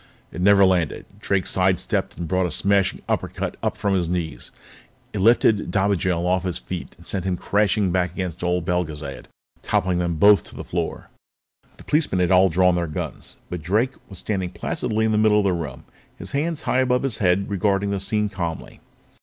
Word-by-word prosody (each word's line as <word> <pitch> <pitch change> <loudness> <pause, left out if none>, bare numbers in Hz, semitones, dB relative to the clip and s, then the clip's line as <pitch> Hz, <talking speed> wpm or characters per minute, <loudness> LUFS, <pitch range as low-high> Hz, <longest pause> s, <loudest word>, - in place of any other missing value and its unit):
It 90 - -6
never 100 +1 +6
landed. 90 -4 0
Drake 100 -2 0
side 95 -1 +2
stepped - - -2
it - - -24
and 85 0 -4
brought 95 +2 +1
a - - -5
smashing 100 +1 +1
uppercut - - -2
up - - -1
from 100 -1 0
his 90 -3 0
knees. 80 -8 -3 0.6
It 105 - -3
lifted 110 0 +3
Dobigel 95 -4 +1
off 90 +1 +2
his 90 -4 -2
feet - - -7
and - - -17
sent 95 -3 -3
him 90 -1 -1
crashing 100 -1 +1
back 90 -1 +1
against 90 -2 -5
old 90 -1 0
Belgezad, 75 -5 -3 0.4
toppling 90 -1 0
them 85 -1 -1
both 100 +5 +6
to - - -13
the - - -6
floor. - - -4 0.7
The - - -13
policemen 150 - +1
had 90 0 +2
all 95 +1 +6
drawn 90 +2 +3
their 85 -1 -1
guns, 75 - -6
but 90 -2 -5
Drake 105 +10 +1 0.2
was 95 - -9
standing 95 -3 -2
placidly 110 +4 -2
in 110 - +1
the 105 - +2
middle 110 -1 +4
of 105 - +3
the 95 - +2
room, 85 -2 -5 0.3
his - - -6
hands 155 +2 -1
high 130 - +1
above 125 0 +2
his 130 -6 -1
head 95 0 +2
regarding 100 0 0
the 100 - -1
scene 105 +2 0
calmly. 85 -5 -5
95 Hz, 200 wpm, -23 LUFS, 90-100 Hz, 0.7 s, never